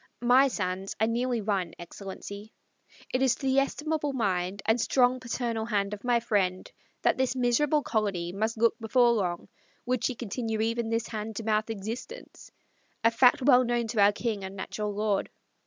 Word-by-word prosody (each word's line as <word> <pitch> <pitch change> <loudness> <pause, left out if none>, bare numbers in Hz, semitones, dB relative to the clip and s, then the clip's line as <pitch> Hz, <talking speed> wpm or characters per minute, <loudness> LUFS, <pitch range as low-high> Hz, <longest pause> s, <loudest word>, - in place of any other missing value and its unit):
My 255 +3 +6
sands 190 -5 -3
are 220 - +3
nearly 240 +1 0
run, 195 -5 -2
Excellency; 200 +4 -9 0.6
it 255 - +1
is 265 -2 +3
to - - -8
the 265 0 +4
estimable 295 +1 -1
mind 195 -4 -1
and 225 +2 +2
strong 255 0 +3
paternal 235 -2 -2
hand 205 -3 -1
of 205 - -7
my 245 -1 +3
friend 190 -5 -1 0.3
that - - +2
this 260 -1 +1
miserable 275 +4 +2
colony 195 -6 -1
must 220 +4 -2
look 230 +1 +3
before 240 +2 +3
long, 180 -6 -1 0.4
would 250 -1 -1
she 255 - 0
continue 225 -1 -3
even 230 +1 0
this 230 0 0
hand 220 0 -5
to 225 - -4
mouth 215 0 0
existence 225 - -7 0.5
a 230 - +5
fact 245 +2 +4
well 255 -2 +6
known 240 -1 0
to 215 -2 +1
our 200 +1 +6
king 210 -1 -3
and 190 +1 -7
natural 210 +2 -4
lord. 205 -1 -1
225 Hz, 175 wpm, -28 LUFS, 205-245 Hz, 0.6 s, My